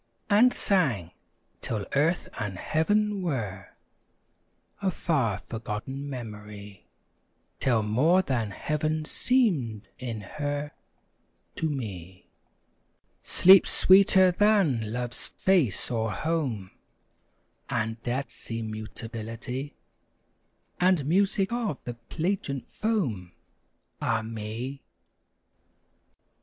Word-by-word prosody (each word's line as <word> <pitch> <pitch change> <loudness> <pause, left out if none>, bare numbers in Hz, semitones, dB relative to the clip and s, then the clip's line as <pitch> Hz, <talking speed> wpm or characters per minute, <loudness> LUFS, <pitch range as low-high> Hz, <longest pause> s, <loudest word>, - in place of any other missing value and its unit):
And 230 +5 +6
sang; 130 - +1 0.5
till 105 -3 -3
Earth 160 +5 +2
and 100 -4 -3
Heaven 205 - +1
were 105 - -3 1.1
A 195 - +1
far, 140 - 0
forgotten 115 +7 -6
memory; 105 -5 -9 0.7
Till 120 -5 +2
more 150 - +3
than 120 - -1
Heaven 155 +7 -2
seemed 145 - +1
in 115 -4 -5
her 145 +6 -4 0.9
To 160 - 0
me: 95 - -6 1.0
Sleep, 190 +1 +7
sweeter 190 -1 +6
than 175 - +2
love's 120 0 -3
face 170 - +1
or 110 -2 0
home, 135 - -2 1.0
And 110 +1 -2
death's 125 +4 -4
immutability, 115 +3 -5 1.0
And 180 -5 +3
music 195 +4 +2
of 235 - -1
the 120 - -5
plangent 140 +3 -3
foam, 130 - -2 0.7
Ah 115 -2 0
me! 115 +5 -5
130 Hz, 85 wpm, -27 LUFS, 110-175 Hz, 1.1 s, Sleep